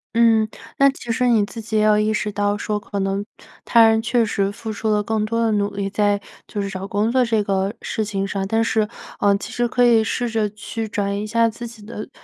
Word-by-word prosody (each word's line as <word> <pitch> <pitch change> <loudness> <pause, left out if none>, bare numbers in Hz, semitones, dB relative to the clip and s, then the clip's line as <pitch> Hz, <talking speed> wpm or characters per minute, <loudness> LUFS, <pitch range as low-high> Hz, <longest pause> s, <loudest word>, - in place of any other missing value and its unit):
嗯， 225 -2 +4 0.3
那 275 0 +7
其 255 -3 -5
实 250 +2 +1
你 225 -4 +4
自 225 +2 -8
己 220 0 -2
也 215 - +3
有 210 0 +4
意 215 +1 +1
识 210 0 -1
到 205 0 0
说， 210 0 -2
可 205 0 -7
能 195 +1 -1 0.4
他 230 -1 +6
人 220 0 +3
确 235 0 +2
实 200 -2 0
付 220 +1 -6
出 215 +1 -2
了 210 -1 +2
更 220 0 -1
多 230 +2 -1
的 230 -1 +2
努 205 -1 0
力， 200 -1 -2
在 205 0 +1 0.3
就 210 - -5
是 - - -3
找 195 0 -5
工 210 +3 0
作 255 0 +3
这 225 -3 +1
个 195 +1 -1
事 220 - -2
情 195 -2 -2
上。 195 0 -2
但 225 +2 +2
是， 220 -2 +1 0.3
呃， 200 -1 +3
其 - - -8
实 240 0 0
可 245 +1 +2
以 230 -2 +5
试 240 +2 -1
着 220 -2 0
去 220 +2 -5
转 200 -2 -2
移 200 - -2
一 - - -5
下 230 +1 +3
自 235 +2 -6
己 225 -3 -13
的 215 -1 -7
215 Hz, 270 characters per minute, -21 LUFS, 205-230 Hz, 0.4 s, 那